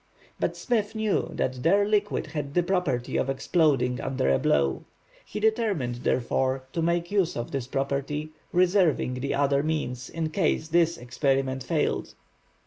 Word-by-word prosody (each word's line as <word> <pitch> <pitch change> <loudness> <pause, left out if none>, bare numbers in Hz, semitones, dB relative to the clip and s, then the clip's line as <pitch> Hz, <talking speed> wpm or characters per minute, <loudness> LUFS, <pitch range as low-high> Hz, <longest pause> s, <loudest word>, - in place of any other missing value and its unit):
But - - -1
Smith 225 -3 -1
knew 220 -2 0
that 130 -1 -2
their 200 +7 +3
liquid 210 -1 +1
had 145 -2 -5
the 175 - +4
property 170 -10 0
of 135 - 0
exploding 135 -4 +1
under 130 - 0
a 65 - +3
blow. 70 -2 +1 0.4
He 210 - -6
determined, 210 - 0
therefore, 130 +2 0
to 165 - -1
make 170 +1 0
use 195 -4 +1
of 120 - -4
this 135 -3 -3
property, 140 +3 -2 0.2
reserving 180 -7 +3
the 125 +2 -2
other 140 0 +2
means 140 -5 -2
in 160 -1 -3
case 160 -2 0
this 170 0 +3
experiment 135 +1 0
failed. 125 - -1
150 Hz, 150 wpm, -26 LUFS, 130-175 Hz, 0.4 s, the